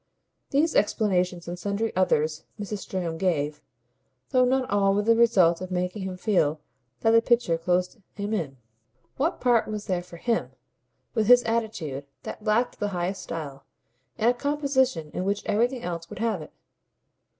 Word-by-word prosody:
These 305 +4 +2
explanations 180 -4 +1
and 175 +1 -5
sundry 205 +4 -2
others 155 -4 +1 0.2
Mrs. 205 0 -4
Stringham 175 -4 -4
gave, 150 -5 0 0.7
though 255 -1 +5
not 260 0 +1
all 195 -1 +2
with 205 0 +1
the 230 0 +5
result 190 -8 +4
of 185 - -5
making 180 +2 -2
him 190 -1 -4
feel 175 -7 +1 0.4
that 225 - +4
the 230 0 +6
picture 235 -8 +2
closed 180 +6 0 0.2
him 205 +1 -3
in. 150 -10 -2 0.6
What 310 +6 0
part 240 -3 +3
was 210 -1 -4
there 180 -2 -1
for 175 -1 -12
HIM, 230 +5 -1 0.6
with 220 -3 +1
his 245 0 +7
attitude 200 -12 -2 0.2
that - - -7
lacked 225 +3 +1
the 205 - 0
highest 180 +3 -2
style, 145 -4 -6 0.5
in 220 - +1
a 245 - +5
composition 265 - 0
in 180 - -2
which 200 +1 -1
everything 240 +4 +1
else 170 -1 -5
would 210 - -8
have 220 -4 -1
it? 155 - -10
200 Hz, 165 wpm, -26 LUFS, 175-230 Hz, 0.7 s, his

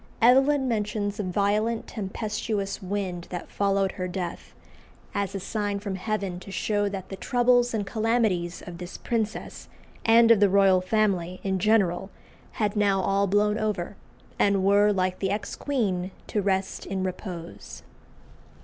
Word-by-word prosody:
Evelyn 265 +3 +5
mentions 210 -2 -1
a - - 0
violent 210 +4 0
tempestuous 210 0 -3
wind 185 -2 -3
that 175 -1 -6
followed 195 -1 +1
her 185 - -4
death, 180 -1 -5 0.6
as 200 -1 -2
a - - -2
sign 205 +1 -2
from 200 -1 -4
Heaven 190 -2 -3
to 185 - -11
show 205 +1 0
that 190 -2 -6
the 195 - -5
troubles 245 +2 +2
and 215 -3 -1
calamities 215 -5 0
of 175 -1 -8
this 180 0 -7
princess 220 -2 -3 0.4
and 230 0 +6
of 225 - +6
the 205 -1 +5
royal 190 -1 +5
family 185 -3 0
in 190 -1 0
general 195 -3 +2 0.4
had 210 -1 -1
now 200 -2 +3
all 195 +1 +1
blown 210 +2 +2
over, 205 -3 -2 0.4
and 200 -2 +3
were, 205 +1 +5
like 185 -2 0
the 195 - 0
ex 205 +2 -3
queen, 195 -10 -1 0.2
to 210 - -1
rest 195 -1 -1
in 190 -1 -2
repose. 180 -2 -6
200 Hz, 150 wpm, -26 LUFS, 190-215 Hz, 0.6 s, and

